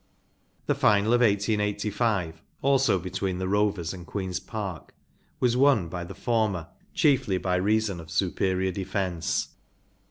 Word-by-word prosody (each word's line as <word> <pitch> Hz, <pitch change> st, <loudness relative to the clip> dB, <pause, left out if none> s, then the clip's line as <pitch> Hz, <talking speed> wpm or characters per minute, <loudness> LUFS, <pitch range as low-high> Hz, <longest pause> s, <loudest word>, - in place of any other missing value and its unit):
The -, -, +2 dB
final 105 Hz, +2 st, +3 dB
of 120 Hz, -, +4 dB
1885, 105 Hz, -4 st, 0 dB, 0.2 s
also 135 Hz, -6 st, +3 dB
between 95 Hz, +1 st, -3 dB
the 95 Hz, 0 st, -2 dB
Rovers 100 Hz, -4 st, 0 dB
and 90 Hz, -2 st, -9 dB
Queen’s 95 Hz, -3 st, -3 dB
Park, 95 Hz, -, -6 dB, 0.4 s
was 125 Hz, -1 st, +2 dB
won 125 Hz, -10 st, +4 dB
by 90 Hz, +1 st, -5 dB
the 90 Hz, +2 st, -9 dB
former 100 Hz, -5 st, 0 dB, 0.3 s
chiefly 130 Hz, -10 st, +3 dB
by 90 Hz, 0 st, 0 dB
reason 105 Hz, -1 st, +1 dB
of 80 Hz, -1 st, -10 dB
superior 95 Hz, +2 st, 0 dB
defence. 95 Hz, -2 st, -2 dB
100 Hz, 130 wpm, -26 LUFS, 90-110 Hz, 0.4 s, of